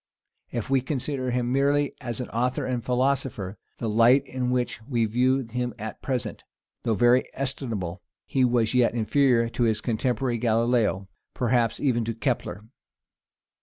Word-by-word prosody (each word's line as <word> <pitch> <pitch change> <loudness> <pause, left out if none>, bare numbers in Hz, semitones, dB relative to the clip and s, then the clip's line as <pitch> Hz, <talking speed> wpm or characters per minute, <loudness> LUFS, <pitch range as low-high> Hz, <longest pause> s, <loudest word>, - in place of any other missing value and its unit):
If 120 -3 -3
we 135 -1 +4
consider 135 -1 -2
him 125 0 0
merely 140 +2 +2
as 120 -3 -4
an 125 - -4
author 125 +2 -1
and 125 -2 -2
philosopher, 125 -5 -1 0.2
the 115 - -3
light 115 +5 +5
in 130 -2 -2
which 125 -3 -1
we 120 -5 +1
view 125 +4 +2
him 120 0 -3
at 110 +1 -7
present, 125 -5 -3 0.4
though 115 - 0
very 120 +3 +4
estimable, 115 -10 -3 0.2
he 130 - +1
was 120 -2 +2
yet 125 -2 +3
inferior 120 +1 +3
to 120 - -1
his 110 -2 +1
contemporary 120 +2 -1
Galilaeo, 115 -4 +1 0.3
perhaps 120 -2 +1
even 125 -5 +1
to 115 0 -3
Kepler. 115 -3 -2
120 Hz, 150 wpm, -26 LUFS, 115-130 Hz, 0.4 s, light